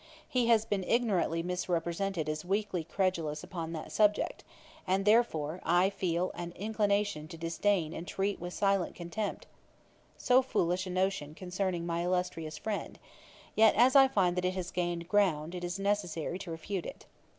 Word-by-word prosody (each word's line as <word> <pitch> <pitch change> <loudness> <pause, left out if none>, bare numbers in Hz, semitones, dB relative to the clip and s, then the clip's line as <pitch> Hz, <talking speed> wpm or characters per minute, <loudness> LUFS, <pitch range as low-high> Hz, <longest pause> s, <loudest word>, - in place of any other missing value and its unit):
He 250 -2 +1
has 225 -2 +4
been 200 -3 -1
ignorantly 195 -8 +1
misrepresented 180 0 -1
as 155 0 -2
weakly 195 -2 -1
credulous 165 -4 -1
upon 165 -3 -5
that 155 - -6
subject; 210 -1 +2 0.4
and, 190 +1 +1
therefore, 185 -8 +3
though - - -1
I 180 +3 +4
feel 180 -2 -1
an 175 0 -6
inclination 205 -5 0
to 165 - -9
disdain 165 0 0
and 170 - -6
treat 195 +1 -1
with 175 +1 -5
silent 195 -3 +1
contempt 190 +5 -4 0.7
so 255 0 +4
foolish 185 -7 0
a - - -5
notion 185 -5 -1
concerning 185 -1 -2
my 170 0 -1
illustrious 175 -4 -2
friend, 215 -2 -4 0.6
yet 220 0 +5
as 255 +3 +5
I 270 -1 +9
find 180 -7 +1
it 185 0 +1
has 180 -2 -4
gained 175 -1 -2
ground, 175 -5 +2
it 180 -1 -5
is 175 +1 -3
necessary 195 -4 -1
to 190 - -7
refute 170 +3 -4
it. - - -10
185 Hz, 160 wpm, -31 LUFS, 170-205 Hz, 0.7 s, I